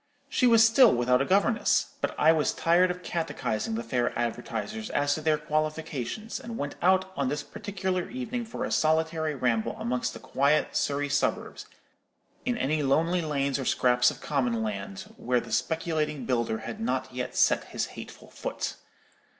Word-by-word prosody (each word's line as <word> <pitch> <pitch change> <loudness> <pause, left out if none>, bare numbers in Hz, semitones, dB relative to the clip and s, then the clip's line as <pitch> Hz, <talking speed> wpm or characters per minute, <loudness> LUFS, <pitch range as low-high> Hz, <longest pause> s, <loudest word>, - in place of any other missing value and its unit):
She 250 - +3
was 230 -1 +7
still 230 +1 +6
without 125 +1 +2
a - - +1
governess: 200 +6 +2
but - - -1
I 155 - +6
was 155 -2 +1
tired 175 +2 +3
of 180 0 -5
catechizing 165 - -2
the 230 - -3
fair 125 - -1
advertisers 110 -2 -3
as 145 0 +1
to 155 - -3
their 155 0 +2
qualifications, 155 - -3
and 230 -1 -7
went 145 0 -3
out 190 +1 +3
on 140 -2 0
this 145 +1 -2
particular 190 -3 -3
evening 245 -1 -4
for 240 +2 -5
a - - -5
solitary 160 0 +1
ramble 120 -4 0
amongst 125 +1 -2
the - - -8
quiet 140 +3 +1
Surrey 145 0 0
suburbs, 145 0 -1 0.8
in 245 -1 0
any 150 0 0
lonely 165 +6 +2
lanes 140 -3 -1
or 135 - -3
scraps 125 0 +3
of - - -8
common 125 -6 0
land 100 -2 -4 0.2
where 125 0 +1
the 115 -1 -9
speculating 155 +2 -1
builder 120 -3 0
had 115 - -6
not 130 +3 -2
yet 125 0 -4
set - - +3
his - - -3
hateful - - -11
foot. - - -4
150 Hz, 170 wpm, -27 LUFS, 125-180 Hz, 0.8 s, was